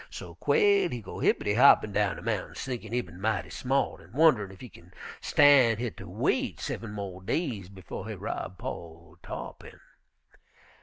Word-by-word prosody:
So - - -9
Quail 410 -3 +3
he 125 - -4
go 110 - -9
hippitty 105 - +2
hoppin' 125 -5 +6
down 100 -1 +1
de - - -10
mountains, - - -3
thinkin' 120 -5 -5
he 125 +1 +1
bin 90 -5 -13
mighty 110 -1 -1
smart, 135 +1 -1
an' 90 +5 -18
wunnerin' 130 -10 +4
ef 95 - -14
he 125 - -8
kin 85 -5 -17 0.3
stan' 135 -6 +5
hit 120 -1 -4
ter - - -9
wait - - -1
seven 110 -2 -5
mo' 100 -3 -6
days 110 - -2
befo' 95 -2 -8
he - - -5
rob 95 - -5
po' - - -7
ol' 85 0 -8
Tarr'pin. - - -8
110 Hz, 175 wpm, -28 LUFS, 95-130 Hz, 0.3 s, hoppin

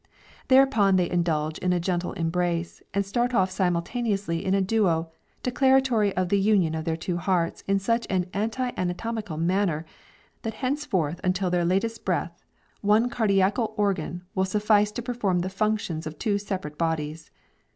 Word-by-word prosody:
Thereupon 260 -7 +5
they 180 -1 +2
indulge 160 -3 0
in 180 - 0
a 175 - +1
gentle 175 0 -1
embrace, 170 0 -1
and 200 0 0
start 240 +5 0
off 190 -2 +2
simultaneously 190 0 -1
in 190 0 +1
a - - +3
duo, 185 -5 +1 0.3
declaratory 255 -4 +3
of 185 -1 +1
the 200 - +3
union 195 -5 +3
of 160 0 -3
their 165 -1 -1
two 175 +1 -3
hearts 170 -1 0
in 195 0 +3
such 230 +4 0
an 185 -2 +1
anti 225 +5 -1
anatomical 185 0 -3
manner, 170 -1 0 0.6
that 225 -2 -4
henceforth 215 - -1
until 185 0 0
their 175 -1 +1
latest 200 +6 0
breath, 170 -2 -1 0.5
one 215 +4 +3
cardiacal 210 0 +1
organ 180 -4 -1
will 190 0 +1
suffice 210 +1 +2
to 240 - -4
perform 235 -7 0
the 185 - -2
functions 190 -5 -1
of 155 -1 -7
two 205 +2 0
separate 185 -7 -5
bodies. 160 -1 -2
190 Hz, 160 wpm, -26 LUFS, 170-215 Hz, 0.6 s, Thereupon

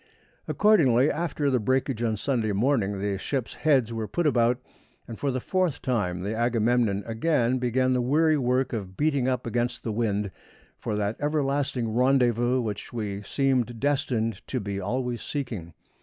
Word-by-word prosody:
Accordingly, 145 - +4
after 155 -4 -1
the 125 - +2
breakage 130 +1 0
on 110 -2 0
Sunday 115 -3 0
morning, 105 -3 +1
the 100 -1 -2
ships' 125 -2 -3
heads 130 -7 +2
were 110 -1 -3
put 175 +8 -1
about, 120 -4 +3 0.5
and 115 - -8
for 140 - 0
the 130 -1 -1
fourth 180 0 0
time 95 -9 -1
the 105 +3 -2
Agamemnon 115 -3 +1
again 125 +1 +1
began 130 +1 +1
the 125 - +1
weary 155 +5 +3
work 130 -1 +1
of 95 -4 -5
beating 140 -4 +1
up 125 -1 -1
against 120 +1 -2
the 115 - -2
wind 105 -3 -1 0.5
for 105 - -3
that 105 +1 -1
everlasting 140 -5 0
rendezvous 125 -1 +3
which 105 -3 -5
we 105 -4 -4
seemed 125 0 0
destined 125 -5 0
to 130 - -2
be 100 -2 -4
always 120 +4 -2
seeking. 115 - -4
120 Hz, 160 wpm, -26 LUFS, 110-135 Hz, 0.5 s, Accordingly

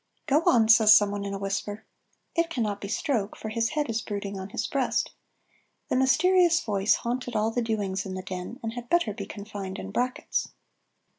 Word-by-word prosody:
"Go 300 +2 +3
on," 225 -3 +5
says 220 -1 +8
someone 205 -1 0
in 200 0 -3
a - - -3
whisper. 200 +2 -4 0.5
It 335 0 +1
cannot 215 -9 -2
be 200 - -5
Stroke, 215 -1 -1
for 220 - -6
his 230 +1 0
head 295 - +1
is 230 -1 -1
brooding 200 -2 -5
on 190 +1 -6
his - - -3
breast. - - 0 0.8
This 255 - +3
mysterious 350 +5 +4
voice 205 - +2
haunted 245 0 -3
all 215 +1 +1
the 245 - -1
doings 205 -4 -1
in 185 - -5
the 185 - -5
Den, 185 +7 -6
and 225 0 -3
had 240 0 -8
better 340 -11 +2
be 200 -1 -6
confined 200 -2 -7
in - - -7
brackets. 250 +1 -2
220 Hz, 195 wpm, -27 LUFS, 200-245 Hz, 0.8 s, says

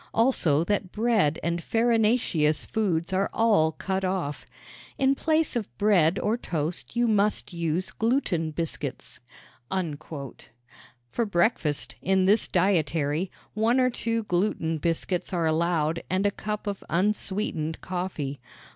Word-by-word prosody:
Also 175 - +3
that 190 0 -1
bread 215 -9 +2
and 170 +1 -1
farinaceous 225 -9 +2
foods 190 -5 -1
are 195 +1 +1
all 210 -9 +3
cut 190 +3 -2
off. 185 -6 -2 0.5
In 270 0 +3
place 315 0 +1
of 230 -4 -1
bread 185 -6 +3
or 220 +3 0
toast 165 -1 -3
you 240 0 +2
must 210 -3 +1
use 170 +2 -1
gluten 220 - 0
biscuits." 165 +1 -4 1.9
For 235 - 0
breakfast, 170 -6 +1
in 190 0 +2
this 205 +3 +3
dietary, 170 -2 +1 0.2
one 225 +4 +2
or 255 0 +3
two 230 -1 -1
gluten 175 -4 0
biscuits 170 +4 -1
are 170 -2 +1
allowed 160 0 +1
and 185 +2 +1
a 205 - +3
cup 210 +1 -5
of 200 -2 -4
unsweetened 185 -3 0
coffee. 175 -7 -4
185 Hz, 125 wpm, -26 LUFS, 165-215 Hz, 1.9 s, Also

